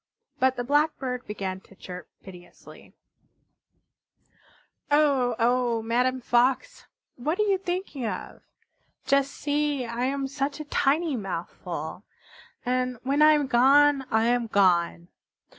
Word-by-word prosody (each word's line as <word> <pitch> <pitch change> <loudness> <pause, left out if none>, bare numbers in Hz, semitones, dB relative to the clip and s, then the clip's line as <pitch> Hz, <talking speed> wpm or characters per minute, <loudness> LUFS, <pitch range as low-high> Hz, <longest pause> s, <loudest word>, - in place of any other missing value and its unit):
But 260 0 +3
the 245 - -3
Blackbird 275 -2 0
began 195 -3 -4
to 195 - -20
chirp 180 -1 -10
piteously: 180 -2 -14 1.9
"Oh, 280 -5 +3
oh, 240 -1 +1
Madame 250 +3 0
Fox! 250 +2 0 0.3
What 305 +8 -2
are - - +4
you 395 -2 +1
thinking 355 - -4
of? - - -6 0.6
Just 275 +1 +2
see, 290 -2 -1
I 235 +1 -3
am 275 +1 -1
such 275 +2 -3
a 305 - -6
tiny 295 +2 +1
mouthful! 180 -4 -6 0.6
And 250 0 -1
when 280 +3 +1
I 305 0 +7
am 295 -2 +1
gone 275 +2 +4
I 220 0 +2
am 240 0 +1
gone. 175 -4 +2
255 Hz, 125 wpm, -26 LUFS, 230-285 Hz, 1.9 s, I